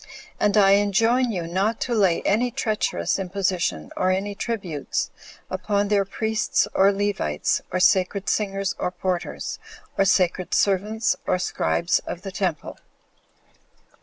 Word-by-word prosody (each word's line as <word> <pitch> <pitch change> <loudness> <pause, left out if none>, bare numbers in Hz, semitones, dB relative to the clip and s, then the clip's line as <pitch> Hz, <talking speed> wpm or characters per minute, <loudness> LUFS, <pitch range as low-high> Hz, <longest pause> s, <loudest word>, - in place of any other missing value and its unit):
And 210 +1 +2
I 195 -2 +6
enjoin 225 +5 +3
you 180 -5 -3
not 190 +7 -1
to 245 - -1
lay 195 -6 +2
any 230 +5 +2
treacherous 210 - -1
imposition, 185 - -2
or 185 - +1
any 195 +2 -1
tributes, 195 - -3 0.4
upon 205 -1 -1
their 200 -1 +2
priests 220 +2 0
or 195 +1 +5
Levites, 195 - -1
or 185 - 0
sacred 190 +2 +2
singers, 195 -2 0
or - - 0
porters, 180 0 -3 0.4
or 195 - +5
sacred 185 -2 +1
servants, 210 +3 +1
or - - +2
scribes 170 - 0
of 180 - -6
the 195 - -5
temple. 185 -5 -3
195 Hz, 135 wpm, -23 LUFS, 180-210 Hz, 0.4 s, I